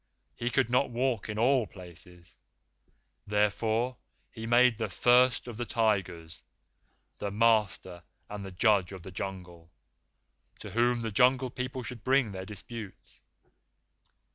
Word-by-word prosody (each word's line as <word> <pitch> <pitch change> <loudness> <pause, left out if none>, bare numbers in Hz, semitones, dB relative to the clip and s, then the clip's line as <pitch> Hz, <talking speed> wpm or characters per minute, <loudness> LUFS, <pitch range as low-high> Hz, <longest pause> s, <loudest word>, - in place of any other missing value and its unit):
He 120 - -2
could 130 0 +2
not 125 +2 +3
walk 120 -3 -1
in 105 - -4
all 125 0 +3
places; 90 -1 -11 0.9
therefore 110 +4 0 0.3
he 115 -1 -7
made 120 0 +5
the 110 -2 -2
First 125 +5 +3
of 120 -3 -7
the 120 - -3
Tigers 95 -8 -1 0.8
the 100 - -2
master 105 -5 +1 0.3
and 105 -1 -7
the 95 - -6
judge 100 -1 +2
of 95 -3 -9
the 95 - -9
Jungle, 90 -3 -7 0.9
to - - -9
whom 120 +1 +2
the 110 - -3
Jungle 125 +3 +3
People 125 0 -4
should 120 -2 -7
bring 130 -4 +2
their 95 -1 -6
disputes. 105 0 -9
110 Hz, 135 wpm, -29 LUFS, 95-125 Hz, 0.9 s, made